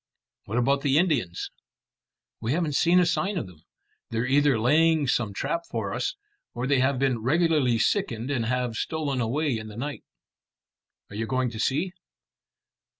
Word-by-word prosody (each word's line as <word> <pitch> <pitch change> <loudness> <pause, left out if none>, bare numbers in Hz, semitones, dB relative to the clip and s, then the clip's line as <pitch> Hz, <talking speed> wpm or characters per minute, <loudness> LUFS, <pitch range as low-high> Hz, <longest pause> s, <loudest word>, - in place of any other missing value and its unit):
"What 110 - -3
about 140 +3 +2
the 140 0 +2
Indians?" 145 - 0 0.9
"We 115 +4 0
haven't 165 -2 0
seen 175 +5 +4
a 180 - +4
sign 190 +3 0
of 160 - -2
them. 90 -4 -15 0.5
They're 115 +1 -1
either 140 -1 +3
laying 155 +5 +3
some 120 -4 +1
trap 145 +11 -2
for - - -3
us, - - -2 0.4
or 120 +1 -2
they 135 0 +2
have 130 +1 +2
been 130 -2 +1
regularly 150 -2 +2
sickened 125 - 0
and 120 -5 -1
have 125 -2 -1
stolen 145 -5 -2
away 135 +4 0
in 110 -1 -5
the 105 0 -10
night." 140 -1 -5 1.1
"Are - - -8
you 110 +1 -2
going 130 -2 0
to 110 - -7
see?" 160 - 0
135 Hz, 165 wpm, -26 LUFS, 115-155 Hz, 1.1 s, seen